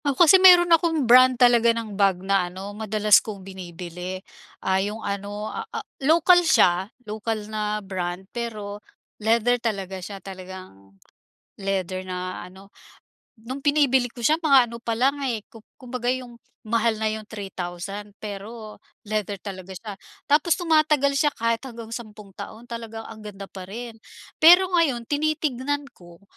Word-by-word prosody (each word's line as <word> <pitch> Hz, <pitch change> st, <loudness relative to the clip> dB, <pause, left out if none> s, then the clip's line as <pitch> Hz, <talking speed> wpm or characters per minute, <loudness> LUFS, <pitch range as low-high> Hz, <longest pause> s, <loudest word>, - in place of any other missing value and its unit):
Ako 285 Hz, +4 st, +4 dB
kasi 370 Hz, +4 st, +7 dB
meron 350 Hz, -2 st, +8 dB
akong 325 Hz, -3 st, +2 dB
brand 255 Hz, +1 st, +7 dB
talaga 240 Hz, -2 st, +5 dB
ng 220 Hz, -2 st, -5 dB
bag 195 Hz, -2 st, +1 dB
na 195 Hz, -2 st, +1 dB
ano 190 Hz, +3 st, -8 dB
madalas 210 Hz, -1 st, +3 dB
kong 200 Hz, -4 st, -8 dB
binibili, 180 Hz, -1 st, -7 dB, 0.5 s
ah, 190 Hz, 0 st, +2 dB
yung 205 Hz, +2 st, -3 dB
ano, 200 Hz, +1 st, -4 dB
ah -, -, -4 dB
ah, -, -, -6 dB, 0.2 s
lokal 340 Hz, +5 st, +5 dB
siya, 190 Hz, -, +3 dB, 0.2 s
lokal 215 Hz, 0 st, -4 dB
na 210 Hz, -1 st, -3 dB
brand 185 Hz, -1 st, -4 dB
pero 210 Hz, -4 st, -5 dB, 0.4 s
leather 235 Hz, +2 st, +2 dB
talaga 195 Hz, -5 st, -3 dB
siya, 200 Hz, +2 st, -7 dB
talagang 185 Hz, -, -11 dB, 0.6 s
leather 185 Hz, -1 st, -3 dB
na 185 Hz, 0 st, -5 dB
ano. 190 Hz, +2 st, -13 dB, 0.7 s
Nung 260 Hz, +5 st, -7 dB
binibili 280 Hz, -4 st, +3 dB
ko 240 Hz, 0 st, -11 dB
siya 310 Hz, +7 st, +3 dB
mga 275 Hz, -7 st, +4 dB
ano 235 Hz, -, -7 dB
pa 230 Hz, -1 st, -3 dB
lang, 270 Hz, +5 st, +1 dB
eh, 230 Hz, -4 st, -2 dB
ku 225 Hz, -, -13 dB, 0.2 s
kumbaga 250 Hz, -1 st, -7 dB
yung 250 Hz, -1 st, -2 dB, 0.2 s
mahal 230 Hz, 0 st, +1 dB
na 220 Hz, -, +1 dB
yung 215 Hz, 0 st, -6 dB
3,000 195 Hz, 0 st, -7 dB
pero 215 Hz, +1 st, -8 dB, 0.2 s
leather 205 Hz, -2 st, -3 dB
talaga 190 Hz, -2 st, -8 dB
siya. 200 Hz, +1 st, -8 dB, 0.3 s
Tapos 305 Hz, +3 st, +4 dB
tumatagal 305 Hz, -5 st, +2 dB
siya 295 Hz, -1 st, +2 dB
kahit 230 Hz, +2 st, -1 dB
hanggang 230 Hz, -3 st, -9 dB
sampung 215 Hz, -3 st, -9 dB
taon, 220 Hz, +4 st, -9 dB
talagang 225 Hz, -1 st, -6 dB
ang 215 Hz, -1 st, -11 dB
ganda 195 Hz, -1 st, -9 dB
pa 190 Hz, -2 st, -9 dB
rin. 230 Hz, +3 st, -8 dB, 0.4 s
Pero 355 Hz, +3 st, +7 dB
ngayon 315 Hz, -9 st, +2 dB
tinitingnan 290 Hz, -2 st, -1 dB
ko, 175 Hz, 0 st, -17 dB
220 Hz, 150 wpm, -24 LUFS, 195-255 Hz, 0.7 s, meron